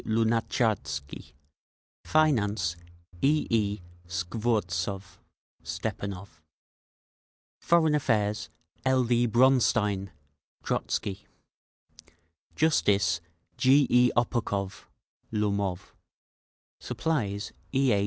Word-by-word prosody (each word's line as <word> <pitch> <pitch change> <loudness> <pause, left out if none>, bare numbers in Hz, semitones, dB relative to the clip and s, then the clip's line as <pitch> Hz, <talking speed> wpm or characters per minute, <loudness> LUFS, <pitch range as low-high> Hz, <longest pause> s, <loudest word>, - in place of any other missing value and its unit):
Lunatcharsky 110 - -1 0.7
Finance: 105 - +2 0.5
E. 150 +2 +3
E. 105 -3 +1 0.3
Skvortsov 95 0 -2 0.4
(Stepanov) 95 -4 -5 1.2
Foreign 165 -3 +3
Affairs: 110 -6 0 0.3
L. 130 -1 +3
D. 120 0 +2
Bronstein 110 -5 +3 0.5
(Trotzky) 100 0 -2 1.3
Justice: 100 - +2 0.4
G. 135 +2 +5
E. 125 0 +6
Oppokov 100 -5 -1 0.5
(Lomov) 100 -4 -1 0.9
Supplies: 105 -11 -2 0.2
E. 135 -2 +3
A. 100 - +2
110 Hz, 65 wpm, -28 LUFS, 100-125 Hz, 1.3 s, E